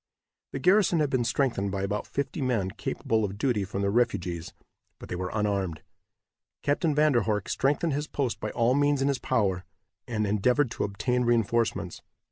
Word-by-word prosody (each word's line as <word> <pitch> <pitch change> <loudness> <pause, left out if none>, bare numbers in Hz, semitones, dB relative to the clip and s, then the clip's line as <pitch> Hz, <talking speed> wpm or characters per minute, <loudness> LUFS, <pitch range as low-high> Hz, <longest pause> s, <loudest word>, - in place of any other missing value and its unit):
The - - -4
garrison 180 +3 +4
had 150 -2 +1
been 130 -2 +2
strengthened 115 -5 0
by 95 0 -2
about 100 +1 -2
fifty 140 +3 -3
men 115 -8 0
capable 110 +3 -1
of 100 -1 -3
duty 115 -3 +1
from 100 +1 -3
the 100 - +1
refugees, 90 -7 0 0.5
but - - -11
they - - -3
were 90 +1 -3
unarmed. 100 -6 -1 0.8
Captain 145 +1 +1
Van 150 0 +4
der 120 -3 +3
Horck 105 -2 -1
strengthened 145 +4 +1
his 150 +2 -2
post 130 -5 -2
by - - -3
all 120 +1 +2
means 145 0 +2
in 140 - +2
his 140 - 0
power, 95 -5 0 0.4
and 110 -3 -1
endeavored 120 +6 +2
to - - -1
obtained 125 +5 -1
reinforcements. 115 0 0
115 Hz, 180 wpm, -27 LUFS, 100-140 Hz, 0.8 s, garrison